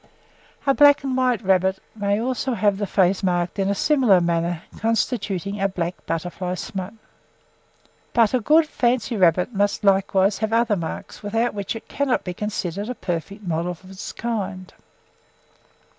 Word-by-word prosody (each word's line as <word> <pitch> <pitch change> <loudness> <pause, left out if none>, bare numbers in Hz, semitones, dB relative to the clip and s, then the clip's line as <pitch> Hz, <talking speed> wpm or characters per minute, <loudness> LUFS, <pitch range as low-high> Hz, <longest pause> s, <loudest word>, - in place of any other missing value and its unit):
A 275 - +4
black 285 0 +6
and 265 -2 -1
white 250 -3 +1
rabbit 190 0 +2 0.2
may 205 -1 0
also 255 +1 -1
have 205 -1 +1
the 205 - -1
face 190 -1 +2
marked 175 0 -1
in 195 0 +1
a 200 - +1
similar 250 -8 +4
manner, 170 0 -1 0.2
constituting 205 -3 -1
a 195 - +2
'black 175 -1 -4
butterfly 180 +2 -3
smut.' 190 +3 -6 1.2
"But 230 -1 +3
A 255 - +3
good 310 +7 +4
fancy 240 -5 0
rabbit 180 +3 +3
must 205 0 0
likewise 195 0 +3
have 220 0 -1
other 230 -2 +3
marks, 170 -4 -6
without 225 +3 0
which 200 +1 -4
it 225 - -9
cannot 280 -3 0
be 180 - -4
considered 205 0 -3
a 250 - -3
perfect 185 +4 -4
model 170 -1 -1
of 185 +2 -15
its 190 +2 -7
kind. 200 -5 -4
200 Hz, 160 wpm, -23 LUFS, 185-230 Hz, 1.2 s, black